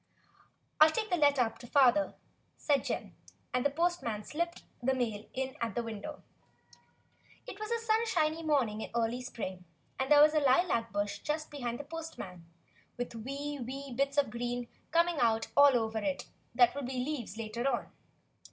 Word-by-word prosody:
"I'll 310 +1 +9
take 430 +5 -2
the - - +4
letter 285 -5 +4
up 225 -1 -4
to 240 - -10
father," 280 +2 +4 0.4
said 280 -4 +2
Jim; - - -3 0.4
and 250 0 +1
the 285 - +3
postman 290 -9 -1
slipped 340 +6 -3 0.2
the 265 +2 +2
mail 225 -4 -2
in 265 +1 -2
at 230 - -2
the 240 - 0
window. 230 +7 -7 1.2
It 395 - -8
was 430 0 -4
a 470 - +1
sunshiny 435 -9 +1
morning 265 -9 +1
in - - -5
early 235 +2 0
spring, 190 -8 -6 0.4
and 265 +2 -1
there 295 0 +9
was 305 0 +5
a 310 - +4
lilac 260 -4 +2
bush 205 0 -2
just 305 +4 -3
behind 245 -5 -4
the - - -4
postman 285 - -8 0.5
with 245 -1 -4
wee, 280 +5 -5
wee 270 +2 -6
bits 275 +3 0
of 280 -6 +3
green 240 +1 -3 0.2
coming 335 -1 +2
out 225 -2 +2
all 285 -2 +7
over 220 -1 -1
it 190 -3 -2 0.3
that 245 -1 +6
would 280 -2 -4
be 255 -1 -2
leaves 255 -8 -4
later 230 +3 -2
on. 245 - -2
265 Hz, 175 wpm, -32 LUFS, 230-300 Hz, 1.2 s, I'll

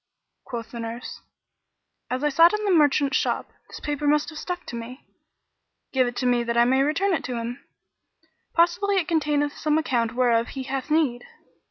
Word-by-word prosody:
Quoth 235 -2 -6
the 235 - -7
nurse, 230 +1 -6 0.9
"As 255 +3 -2
I 295 - +3
sat 330 +5 +6
in 425 - -4
the 400 - +2
merchant's 295 -4 +3
shop, - - -2 0.2
this - - -10
paper 295 0 -3
must 300 +2 +2
have 310 - -8
stuck 360 -1 -5
to 240 - -7
me: 235 +3 -8 0.9
give 260 -2 +3
it 245 - -4
to 255 - -2
me 245 -1 +2
that 235 0 -2
I 235 - +6
may 265 +2 +3
return 370 +8 +1
it 290 - -1
to 250 - -3
him; 235 +3 -5 0.9
possibly 355 +4 +3
it 370 -4 +1
containeth 295 -3 +1
some 305 0 +1
account 245 -7 0
whereof 235 -2 +2
he 270 - -6
hath 265 +1 -4
need." 295 -6 +1
275 Hz, 190 wpm, -24 LUFS, 245-315 Hz, 0.9 s, sat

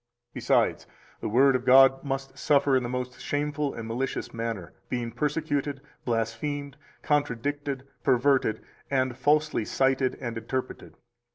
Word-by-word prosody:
Besides, - - +1 0.3
the - - -3
Word 135 +4 +5
of 125 - -1
God 135 +1 +6
must 135 -1 -4
suffer 140 -1 +3
in 130 - +3
the 120 - -4
most 125 0 -4
shameful 145 0 -2
and 115 -1 -6
malicious 125 +4 -3
manner, 115 -6 -4 0.2
being 120 -2 -2
persecuted, 145 +1 -1 0.3
blasphemed, 125 +5 -2 0.3
contradicted, 145 -1 -1 0.2
perverted, 130 -3 +2 0.3
and 130 -2 +1
falsely 150 +1 +2
cited 130 +2 +1
and 115 -3 -4
interpreted. 130 +3 -5
135 Hz, 125 wpm, -27 LUFS, 120-145 Hz, 0.3 s, God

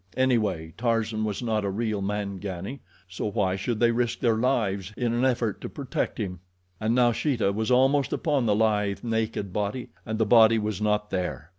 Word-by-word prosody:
Anyway, 105 -11 +1
Tarzan 115 -2 0
was 105 +3 -3
not 110 -3 0
a 100 - -1
real 105 0 -2
Mangani, 100 +3 -4 0.3
so 95 +3 -4
why 95 -3 0
should 105 +4 -2
they 120 -1 +4
risk 120 0 0
their 115 -2 +2
lives 105 -6 0
in 120 -2 0
an 120 +2 0
effort 120 -5 0
to - - -5
protect - - -3
him? 90 -3 -4 0.4
And 110 +2 +1
now 120 -1 +4
Sheeta 115 -4 0
was 110 +3 -2
almost 135 +1 +3
upon 145 -6 0
the 105 - +3
lithe, 105 -2 +1
naked 110 -4 -2
body, 105 +4 -2
and 110 0 -3
the 110 - +2
body 115 +1 +6
was 105 -2 -2
not 105 0 0
there. 85 -6 -3
110 Hz, 185 wpm, -26 LUFS, 100-120 Hz, 0.4 s, body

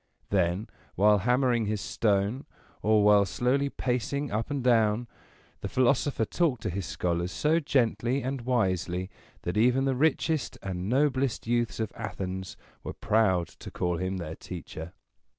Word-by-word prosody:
Then, 95 +2 +1 0.3
while 105 +2 +5
hammering 125 +1 +2
his 105 0 -1
stone, 105 +7 0 0.3
or 110 -1 +4
while 105 -1 +6
slowly 125 +8 0
pacing 135 +2 -2
up 110 +5 -2
and 140 -3 -2
down, 115 -1 +3 0.5
the - - -4
philosopher 130 -1 +2
talked 145 -3 0
to 105 - -1
his 95 -1 -4
scholars 85 +4 -1
so 155 +2 +2
gently 130 -2 +1
and 130 0 -3
wisely, 95 -6 0 0.3
that 90 +3 -2
even 125 +4 +3
the 135 - +2
richest 155 +2 0
and 95 0 -3
noblest 135 -1 +1
youths 120 0 0
of 110 - -2
Athens 95 -3 -5 0.3
were - - -5
proud 95 -6 +2
to - - -11
call 90 -1 -1
him 95 +2 -2
their 85 -3 -5
teacher. 80 +2 -8
110 Hz, 150 wpm, -28 LUFS, 95-130 Hz, 0.5 s, while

